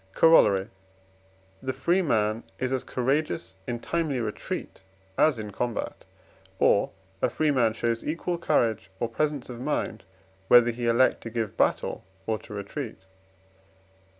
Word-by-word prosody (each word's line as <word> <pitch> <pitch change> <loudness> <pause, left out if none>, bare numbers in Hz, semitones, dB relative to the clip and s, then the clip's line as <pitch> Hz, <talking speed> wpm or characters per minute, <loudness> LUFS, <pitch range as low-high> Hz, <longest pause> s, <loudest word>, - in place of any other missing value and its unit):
Corollary. 105 -12 +5 0.9
The 130 0 -2
free 170 +9 +2
man 110 - +1
is 130 0 -2
as 130 - -1
courageous 135 -3 -1
in 120 -1 -2
timely 160 -6 -1
retreat 105 -4 -4 0.3
as 155 +2 +4
in 105 -1 -6
combat; 120 +3 -3 0.5
or, - - +4 0.3
a - - +3
free 155 -1 +1
man 120 -5 +3
shows 115 0 -1
equal 170 +2 -2
courage 110 - +1
or 120 - 0
presence 145 +3 -1
of 120 -1 -8
mind, 125 -6 -2 0.4
whether 120 +1 +7
he 120 0 -3
elect 120 +2 +3
to 115 - -6
give 110 -3 -3
battle - - 0 0.2
or 110 -1 -1
to 110 - -11
retreat. 100 -1 -6
120 Hz, 140 wpm, -27 LUFS, 110-145 Hz, 0.9 s, whether